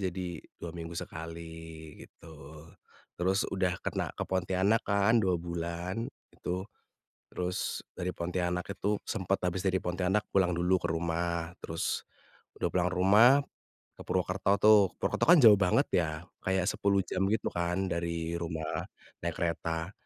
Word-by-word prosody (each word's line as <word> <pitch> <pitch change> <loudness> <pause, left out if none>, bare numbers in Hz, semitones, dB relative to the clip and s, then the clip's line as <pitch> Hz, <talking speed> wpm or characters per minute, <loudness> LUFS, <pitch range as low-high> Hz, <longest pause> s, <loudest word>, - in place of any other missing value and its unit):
jadi 90 -3 -3 0.2
2 85 - -4
minggu 85 0 -6
sekali, 80 +1 -7 0.6
gitu. 75 -1 -13 0.5
Terus 95 +3 +2
udah 95 -2 0
kena - - -2
ke - - -3
Pontianak 95 +4 +1
kan, 100 +3 +4
2 95 -2 +2
bulan, 85 +5 -3 0.3
itu, 90 +1 -3 0.7
terus 90 0 -3
dari 90 0 -2
Pontianak 90 0 -1
itu 100 +2 0
sempet 95 -2 0
habis 90 0 0
dari 95 0 +2
Pontianak 95 +3 0
pulang 95 -2 +3
dulu 90 +2 +2
ke - - -1
rumah, 85 0 -1
terus 80 +1 -2 0.6
udah - - +1
pulang 90 -1 +2
rumah, 100 +7 +6 0.7
ke - - -9
Purwokerto 95 +1 0
tuh. 105 +1 +8 0.2
Purwokerto - - +1
kan 175 - +9
jauh 110 -3 +9
banget 90 -2 +3
ya, 85 -3 +2 0.3
kayak 95 -1 +1
10 100 -1 +2
jam 95 - -1
gitu 110 - 0
kan 90 +2 -1
dari 85 -1 -2
rumah, 80 -2 -3 0.4
naik - - -2
kereta. 85 +1 -2
90 Hz, 140 wpm, -30 LUFS, 85-95 Hz, 0.7 s, kan